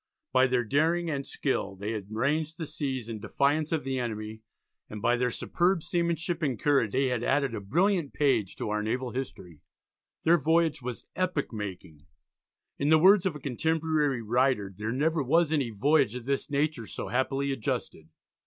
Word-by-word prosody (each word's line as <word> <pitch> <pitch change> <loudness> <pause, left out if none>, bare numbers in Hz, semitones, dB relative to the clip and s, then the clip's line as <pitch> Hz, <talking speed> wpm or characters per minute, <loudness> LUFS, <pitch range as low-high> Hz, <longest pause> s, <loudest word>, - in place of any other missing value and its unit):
By 130 +1 +5
their 125 -1 +1
daring 160 +7 +1
and 140 -2 -3
skill 100 -8 -2
they 100 +3 -4
had 105 -3 -5
ranged 150 +8 -1
the 165 - -4
seas 130 -5 -4
in 115 -2 -5
defiance 140 +8 0
of 160 -4 0
the 135 0 -2
enemy, 110 -2 -4 0.5
and 105 - -6
by 120 +4 +2
their 125 0 +1
superb 175 +7 0
seamanship 170 0 -1
and 135 -8 -1
courage 135 -8 +2
they 130 0 +2
had 120 -2 -1
added 135 -2 +1
a 105 - -4
brilliant 170 - +1
page 130 -10 +1
to 105 - -4
our 105 0 0
naval 125 +3 -2
history. 95 - -7 0.6
Their 170 +1 +5
voyage 160 0 +2
was 125 -1 -6
epoch 180 -8 -1
making. 90 -7 -7 0.7
In 145 - +1
the 160 - +7
words 190 +3 +6
of 170 - -3
a - - -7
contemporary 150 -1 0
writer 120 -3 +1
"there 110 +3 -3
never 155 +5 +1
was 160 +4 +2
any 140 -6 +1
voyage 125 +2 +2
of 125 -2 -6
this 140 +3 -1
nature 145 -5 -1
so - - -6
happily 135 +2 0
adjusted." 95 -9 -4
135 Hz, 180 wpm, -28 LUFS, 115-155 Hz, 0.7 s, the